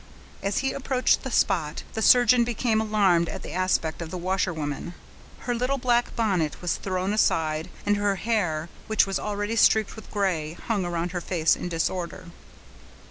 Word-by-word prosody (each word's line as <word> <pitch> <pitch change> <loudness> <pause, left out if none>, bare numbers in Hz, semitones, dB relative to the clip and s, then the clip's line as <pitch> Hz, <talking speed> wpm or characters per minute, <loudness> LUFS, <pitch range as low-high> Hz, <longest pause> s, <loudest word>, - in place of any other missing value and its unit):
As 200 0 -1
he 265 - +1
approached 260 -2 +1
the 265 - -5
spot, 170 -10 0
the 220 - -3
surgeon 245 +1 +6
became 230 -1 0
alarmed 195 -6 +2
at - - -6
the - - -7
aspect 180 -3 0
of 165 - -5
the 180 - -5
washerwoman. 175 -3 -2 0.5
Her 245 - -2
little 250 +3 0
black 245 -1 +1
bonnet 190 -9 0
was 175 -2 -1
thrown 185 +1 -2
aside, 160 -5 +1 0.2
and 205 0 +2
her 205 -1 +1
hair, 175 -6 -1 0.2
which 220 -1 +3
was 195 -1 -2
already 205 +1 -2
streaked 220 -2 +3
with 220 - -12
gray, 175 -7 -1
hung 200 +1 -2
around 175 0 -2
her 175 -1 -3
face 165 -2 +2
in 180 - -5
disorder. 170 +1 -3
195 Hz, 170 wpm, -25 LUFS, 170-220 Hz, 0.5 s, surgeon